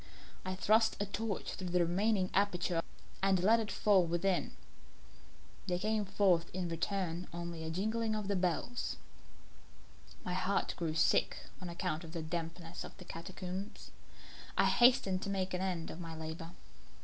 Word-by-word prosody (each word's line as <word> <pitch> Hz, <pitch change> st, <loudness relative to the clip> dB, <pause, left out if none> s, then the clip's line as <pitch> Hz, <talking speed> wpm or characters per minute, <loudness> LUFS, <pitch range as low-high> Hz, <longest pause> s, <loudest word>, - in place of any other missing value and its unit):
I 185 Hz, 0 st, -2 dB
thrust 220 Hz, +3 st, +4 dB
a 205 Hz, -, +1 dB
torch 205 Hz, 0 st, -3 dB
through 185 Hz, -1 st, -4 dB
the 180 Hz, +1 st, +2 dB
remaining 190 Hz, +2 st, +1 dB
aperture 180 Hz, -4 st, +2 dB, 0.4 s
and 190 Hz, -1 st, +4 dB
let 225 Hz, +4 st, +6 dB
it 220 Hz, -2 st, -2 dB
fall 200 Hz, -3 st, +4 dB
within. 175 Hz, +2 st, 0 dB, 1.1 s
There 180 Hz, -1 st, +1 dB
came 215 Hz, +2 st, 0 dB
forth 190 Hz, -4 st, +3 dB
in 180 Hz, -2 st, -1 dB
reply 175 Hz, +1 st, -1 dB
only 170 Hz, -1 st, -5 dB
a 160 Hz, -, -3 dB
jingling 220 Hz, +5 st, 0 dB
of 210 Hz, -2 st, -3 dB
the 200 Hz, -, +1 dB
bells. 185 Hz, +7 st, -1 dB, 1.3 s
My 180 Hz, -, -2 dB
heart 190 Hz, +2 st, 0 dB
grew 160 Hz, -2 st, -2 dB
sick 160 Hz, -, +2 dB, 0.2 s
on 180 Hz, -, -5 dB
account 170 Hz, -1 st, -2 dB
of 165 Hz, -1 st, -9 dB
the 165 Hz, -2 st, -3 dB
dampness 165 Hz, +1 st, -4 dB
of -, -, -10 dB
the 180 Hz, -, -11 dB
catacombs. 185 Hz, +4 st, -6 dB, 0.7 s
I -, -, +5 dB
hastened 240 Hz, -7 st, +5 dB
to 200 Hz, -, -3 dB
make 190 Hz, -1 st, -1 dB
an 180 Hz, -, -1 dB
end 180 Hz, -4 st, -2 dB
of 160 Hz, -, -8 dB
my 165 Hz, -2 st, -6 dB
labour. 160 Hz, +1 st, -6 dB
185 Hz, 160 wpm, -34 LUFS, 170-200 Hz, 1.3 s, let